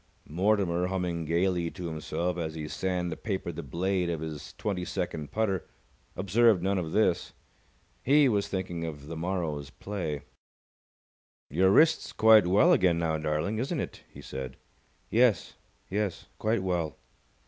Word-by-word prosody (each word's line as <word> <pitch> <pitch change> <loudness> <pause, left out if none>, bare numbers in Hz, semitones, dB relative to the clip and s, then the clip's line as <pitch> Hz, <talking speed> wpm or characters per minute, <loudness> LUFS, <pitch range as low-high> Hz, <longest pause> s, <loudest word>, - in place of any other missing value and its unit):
Mortimer, 90 0 +1
humming 90 -3 -2
gaily 85 +1 +1
to 90 0 -8
himself 85 +2 -2
as 80 -2 -4
he 75 -1 -5
sand 90 0 -2
papered 95 -6 -3
the 85 - -4
blade 90 +5 -1
of 85 -2 -2
his 80 -2 -7
twenty 95 -4 -2
second 75 -3 -3
putter, 100 -5 -1 0.5
observed 100 0 +3
none 95 0 +1
of 80 -3 -4
this. 105 -4 +1 0.7
He 145 +2 +5
was 105 -5 +1
thinking 90 -3 -3
of 75 -3 -6
the 80 +2 -6
morrow's 80 -4 -2
play. 80 -4 -4 1.3
"Your 95 +6 +4
wrist's 160 +11 +4
quite 110 -4 +6
well 100 +4 +5
again 90 -3 +3
now, 80 -2 0
darling, 75 +7 -1
isn't 140 +6 -1
it?" - - -5
he - - -12
said. 65 -1 -6 0.5
"Yes. 120 -1 +3 0.3
Yes, 100 -1 -2
quite 110 -2 +1
well." 85 -6 -1
90 Hz, 145 wpm, -29 LUFS, 80-100 Hz, 1.3 s, quite